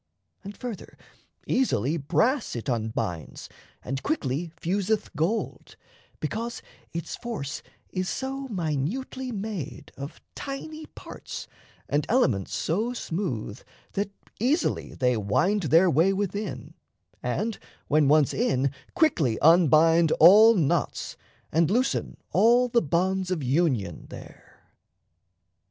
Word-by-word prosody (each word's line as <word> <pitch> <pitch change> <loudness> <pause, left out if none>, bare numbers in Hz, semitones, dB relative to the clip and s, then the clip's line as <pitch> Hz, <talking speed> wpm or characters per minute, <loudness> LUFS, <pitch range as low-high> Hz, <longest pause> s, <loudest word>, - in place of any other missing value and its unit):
And, 200 +1 -9
further, 240 -6 -7 0.5
easily 160 - +1
Brass 195 - +1
it 115 - -5
unbinds 110 - -3 0.3
and 135 +1 -3
quickly 165 - -2
fuseth 200 +3 -1
gold, 170 +9 -2 0.4
Because 235 +2 -4 0.3
its 170 -1 -4
force 210 - -5 0.3
is 185 0 -2
so 270 +1 -4
minutely 205 - -3
made 200 - -5
Of 140 +4 -8
tiny 310 +3 -6
parts - - -9 0.4
and 145 +1 0
elements 125 - +2
so 215 +9 -1
smooth 160 - -4 0.3
That 200 +1 -2 0.3
easily 270 - 0
they 125 -1 +2
wind 180 - +1
their 170 +4 +6
way 170 +4 +3
within, 200 +1 -3 0.5
And, 200 - -2 0.3
when 150 -1 +3
once 150 -1 +4
in, 140 - +1 0.2
quickly 165 - +2
unbind 165 0 +5
all 215 +7 +8
knots 165 -4 0 0.4
And 160 0 +3
loosen 250 +5 0
all 245 +2 +4
the 235 0 +3
bonds 185 +4 0
of 175 -6 -1
union 130 - 0
there. - - -13
175 Hz, 110 wpm, -26 LUFS, 145-225 Hz, 0.5 s, all